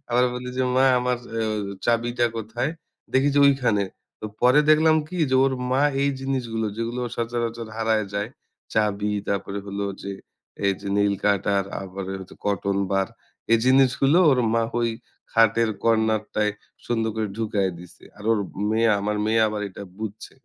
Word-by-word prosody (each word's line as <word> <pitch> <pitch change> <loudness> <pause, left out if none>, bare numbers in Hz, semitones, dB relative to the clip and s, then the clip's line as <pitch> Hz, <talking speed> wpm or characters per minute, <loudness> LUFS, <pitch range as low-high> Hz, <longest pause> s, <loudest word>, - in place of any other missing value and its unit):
আবার 125 +1 +4
বলি 125 0 -5
যে, 130 - +2
"মা 130 - +5 0.2
আমার 125 0 0 0.2
আ - - 0 0.5
চাবিটা 120 +1 +2
কোথায়?" 110 +6 -2 0.4
দেখি 135 +2 +4
যে 145 - +5
ঐখানে। 125 -7 +2 0.4
ত - - -32 0.2
পরে 125 +4 +6
দেখলাম 155 +1 +5
কি? 180 - -6
যে 130 - +4
ওর 135 - +2 0.2
মা 135 +2 +3 0.2
এই 140 - +2
জিনিসগুলো 120 -5 -2
যেগুলো 115 +2 -2 0.2
সচরাচর 115 -1 -3
হারায় 110 -2 +1
যায়। 105 +3 -2 0.4
চাবি 105 -1 +1 0.2
তারপরে 100 0 -2
হলো 100 0 -3 0.2
যে 100 - -4 0.5
এইযে 100 +1 -1
নেইল 100 -1 +3
কাটার, 100 -1 +2 0.2
আবার 95 0 -6
এইযে 95 -1 -9
কটন 100 0 0 0.2
বার, 95 -1 +1 0.4
এই 115 - +6
জিনিসগুলো 135 +4 +4
ওর 130 - +3 0.2
মা 115 - +3 0.2
ঐ - - +1 0.5
খাটের 115 0 +4
কর্নারটায় 110 -2 +1 0.3
সুন্দর 115 -2 0
করে 110 -1 -1
ঢুকাইয়া 105 -4 0
দিছে। 90 - -14
আর 105 - -11
ওর 110 - +2 0.3
মেয়ে 115 +1 +3
আমার 105 +1 -1
মেয়ে 110 +1 +3
আবার 105 0 -3
এটা 95 - -9 0.2
বুঝছে। 110 -1 -7
110 Hz, 160 wpm, -24 LUFS, 100-125 Hz, 0.5 s, পরে